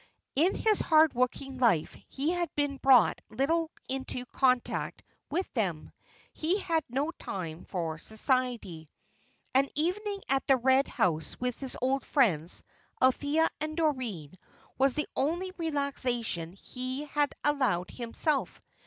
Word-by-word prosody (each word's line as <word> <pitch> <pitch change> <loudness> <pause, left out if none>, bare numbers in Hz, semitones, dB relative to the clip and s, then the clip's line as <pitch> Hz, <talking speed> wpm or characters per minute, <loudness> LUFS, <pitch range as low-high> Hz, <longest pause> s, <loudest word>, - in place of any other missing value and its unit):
In 335 +8 +3
his 435 -2 +2
hard 315 -1 +5
working 255 +2 -1
life 220 -11 +3
he 285 +4 -1
had 350 -1 -1
been 290 -1 0
brought 265 -4 +5
little 310 +8 +1 0.2
into 260 -1 -4
contact 255 -1 0 0.3
with 365 +4 -1
them. 180 - -2 0.4
He 335 +5 +1
had 330 -5 0
no 275 +6 -1
time 170 - -6
for 165 -4 -3
society. 220 - -1 0.6
An 270 +1 +4
evening 395 +6 -1
at 270 0 +1
the 270 - +5
Red 260 +2 +4
House 160 -4 -1
with 250 -1 -2
his 265 -2 -6
old 270 +1 +1
friends, 180 - +1 0.4
Althea 285 +5 +3
and 310 +1 -4
Doreen, 230 - -2 0.4
was 265 -1 +3
the 300 - -1
only 345 +7 0
relaxation 255 - -1
he 255 +7 -5
had 295 0 0
allowed 255 -12 +1
himself. 260 +4 -1
265 Hz, 130 wpm, -30 LUFS, 230-300 Hz, 0.6 s, hard